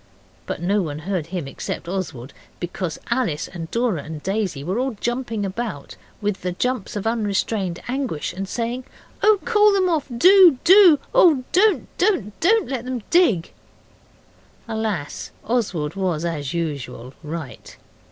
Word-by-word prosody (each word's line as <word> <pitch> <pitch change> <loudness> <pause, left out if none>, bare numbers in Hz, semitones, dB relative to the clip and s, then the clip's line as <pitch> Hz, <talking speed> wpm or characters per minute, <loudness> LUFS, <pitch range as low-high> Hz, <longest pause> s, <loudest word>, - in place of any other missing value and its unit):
But 165 - -4
no 200 +3 +2
one 150 -5 -4
heard 170 0 -3
him 170 -5 -4
except 135 - -5
Oswald, 160 -9 -5 0.3
because 175 -1 -4
Alice 235 -12 0
and 165 -3 -7
Dora 230 -9 0
and 150 0 -8
Daisy 190 -8 -2
were 185 +9 -1
all 260 -2 -1
jumping 240 -4 -2
about 195 -6 -5 0.3
with 205 -2 -2
the 180 -1 -2
jumps 250 +2 -2
of 205 - -3
unrestrained 205 -4 -1
anguish, 250 - -2
and 195 +1 -5
saying, 245 +2 -3 0.4
'Oh, 430 -1 +5
call 425 -3 +5
them 380 -2 +2
off! 315 -4 0
Do! 365 0 +7
do! 360 -2 +8 0.2
oh, 335 - +5
don't, 420 +3 +3
don't! 345 - +1
Don't 440 +6 +3
let 260 -4 -3
them 250 -3 -4
dig.' 245 - +3 1.1
Alas! 220 -9 -3 0.2
Oswald 190 -10 -1
was, 175 -4 -1
as 150 -5 -3
usual, 140 -7 -4
right. 155 -3 -8
205 Hz, 145 wpm, -22 LUFS, 170-255 Hz, 1.1 s, do